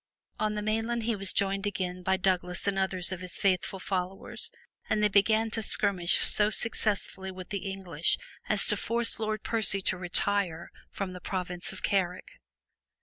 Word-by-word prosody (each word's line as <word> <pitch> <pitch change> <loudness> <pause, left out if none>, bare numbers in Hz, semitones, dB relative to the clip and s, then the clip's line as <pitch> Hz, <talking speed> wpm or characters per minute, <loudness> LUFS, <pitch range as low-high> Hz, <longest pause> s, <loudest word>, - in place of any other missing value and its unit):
On 215 0 0
the 210 - -3
mainland 225 +2 -1
he 230 0 0
was 195 -1 -4
joined 195 +1 0
again 185 -2 -3
by 190 +1 +1
Douglas 180 -2 0
and 200 -1 0
others 185 -1 -1
of 185 - -4
his 180 -1 -1
faithful 190 0 0
followers, 185 0 -3 0.4
and 215 -1 +1
they - - +6
began 220 +3 +3
to 225 - -2
skirmish 195 -4 +3
so 210 0 +4
successfully 210 -4 +1
with 185 -1 -9
the 200 -1 -4
English 175 -5 -1 0.3
as 210 -2 +2
to 210 - +4
force 235 +2 +1
Lord 215 -1 -3
Percy 220 -4 +5
to 185 - +1
retire 180 -1 +1 0.2
from 195 -2 -5
the 180 - -9
province 180 -2 -4
of - - -10
Carrick. 185 -2 -2
195 Hz, 170 wpm, -28 LUFS, 185-210 Hz, 0.4 s, they